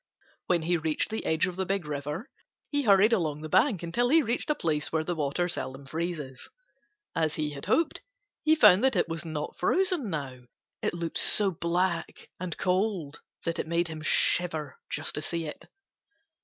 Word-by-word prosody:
When 175 Hz, -2 st, +2 dB
he 175 Hz, +2 st, +2 dB
reached 160 Hz, +5 st, -1 dB
the 220 Hz, -, -2 dB
edge 160 Hz, +1 st, +2 dB
of 180 Hz, -1 st, -5 dB
the 190 Hz, -, -1 dB
Big 195 Hz, -3 st, -1 dB
River, 150 Hz, -, -4 dB, 0.4 s
he 290 Hz, -1 st, +1 dB
hurried 210 Hz, -1 st, +5 dB
along 155 Hz, -8 st, 0 dB
the 155 Hz, -, -6 dB
bank 200 Hz, -, +3 dB
until 240 Hz, +9 st, 0 dB
he 320 Hz, +2 st, +5 dB
reached 235 Hz, +5 st, -2 dB
a 300 Hz, -, +2 dB
place 155 Hz, -, -1 dB
where 160 Hz, -1 st, 0 dB
the 175 Hz, -, -2 dB
water 155 Hz, +2 st, -1 dB
seldom 135 Hz, -5 st, -3 dB
freezes. 155 Hz, -3 st, -5 dB, 0.7 s
As 160 Hz, -2 st, 0 dB
he 150 Hz, -1 st, -2 dB
had 140 Hz, -1 st, -7 dB
hoped, 330 Hz, -1 st, +1 dB, 0.4 s
he 315 Hz, 0 st, +5 dB
found 195 Hz, -9 st, +6 dB
that 265 Hz, 0 st, +3 dB
it -, -, +2 dB
was 165 Hz, -1 st, -4 dB
not 155 Hz, -2 st, -5 dB
frozen 360 Hz, -, +1 dB
now. 140 Hz, -6 st, -4 dB, 0.4 s
It -, -, -1 dB
looked 170 Hz, -1 st, -2 dB
so 205 Hz, -2 st, +6 dB
black 170 Hz, +1 st, -2 dB
and 180 Hz, -2 st, -4 dB
cold 185 Hz, -5 st, -1 dB, 0.2 s
that 165 Hz, -, -2 dB
it -, -, -2 dB
made 170 Hz, +1 st, 0 dB
him 155 Hz, -1 st, -6 dB
shiver 155 Hz, -2 st, +1 dB
just -, -, -2 dB
to 150 Hz, -, -3 dB
see 165 Hz, +2 st, -3 dB
it. 150 Hz, -, -8 dB
170 Hz, 185 wpm, -28 LUFS, 155-195 Hz, 0.7 s, found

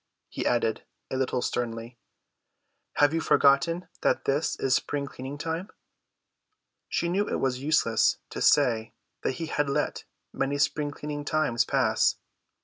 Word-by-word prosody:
He -, -, -3 dB
added 115 Hz, -2 st, +1 dB, 0.3 s
a -, -, -1 dB
little 130 Hz, -1 st, 0 dB
sternly, 115 Hz, 0 st, -3 dB, 0.9 s
"Have 145 Hz, +1 st, +3 dB
you 165 Hz, -, +1 dB
forgotten 165 Hz, +6 st, +3 dB
that -, -, +1 dB
this 140 Hz, +3 st, +1 dB
is 135 Hz, -, 0 dB
spring 140 Hz, +2 st, 0 dB
cleaning 135 Hz, +1 st, -7 dB
time?" 165 Hz, +5 st, -3 dB, 1.2 s
She 170 Hz, -, 0 dB
knew 195 Hz, +4 st, 0 dB
it -, -, -1 dB
was 130 Hz, -1 st, -1 dB
useless 140 Hz, -6 st, +3 dB
to -, -, -5 dB
say 110 Hz, -2 st, +3 dB, 0.3 s
that -, -, 0 dB
he 165 Hz, -, -4 dB
had 145 Hz, -2 st, -1 dB
let 140 Hz, -, -1 dB, 0.3 s
many 140 Hz, +1 st, -1 dB
spring 145 Hz, 0 st, +1 dB
cleaning 145 Hz, 0 st, -5 dB
times 145 Hz, -6 st, +1 dB
pass. -, -, +2 dB
140 Hz, 145 wpm, -27 LUFS, 125-155 Hz, 1.2 s, Have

